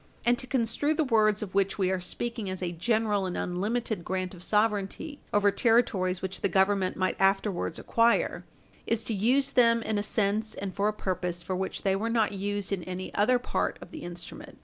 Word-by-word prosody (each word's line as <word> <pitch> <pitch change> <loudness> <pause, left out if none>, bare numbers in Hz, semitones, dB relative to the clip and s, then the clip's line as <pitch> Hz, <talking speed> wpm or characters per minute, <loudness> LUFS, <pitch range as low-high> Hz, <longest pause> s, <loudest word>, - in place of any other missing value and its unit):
And 240 0 +5
to 255 - -5
construe 260 +4 0
the 315 - +2
words 215 -5 +3
of 195 - -8
which 195 0 +1
we 190 -2 +1
are 190 -1 -1
speaking 230 +3 -4
as 185 0 -4
a 175 - -1
general 210 +2 0
and 180 - -4
unlimited 210 +2 -2
grant 185 +1 -3
of 175 - -12
sovereignty 210 - 0
over 205 0 +4
territories 195 -6 +2
which 190 0 -4
the - - +1
Government 190 -1 +2
might 185 0 -1
afterwards 195 -3 +1
acquire 230 0 +2 0.4
is 230 -1 +1
to 225 - -3
use 255 +7 +3
them 230 -2 +4
in 215 -1 -1
a - - 0
sense 215 +1 0
and 195 -1 -5
for 200 +1 0
a - - +2
purpose 180 -4 -3
for 185 - -3
which 190 +1 -3
they 195 -1 +2
were 220 +4 -1
not 225 -2 +2
used 205 0 -3
in 190 - -2
any 185 0 -6
other 230 +5 +3
part 245 - -2
of - - -12
the 315 - -8
instrument. 175 0 -8
205 Hz, 205 wpm, -28 LUFS, 190-230 Hz, 0.4 s, And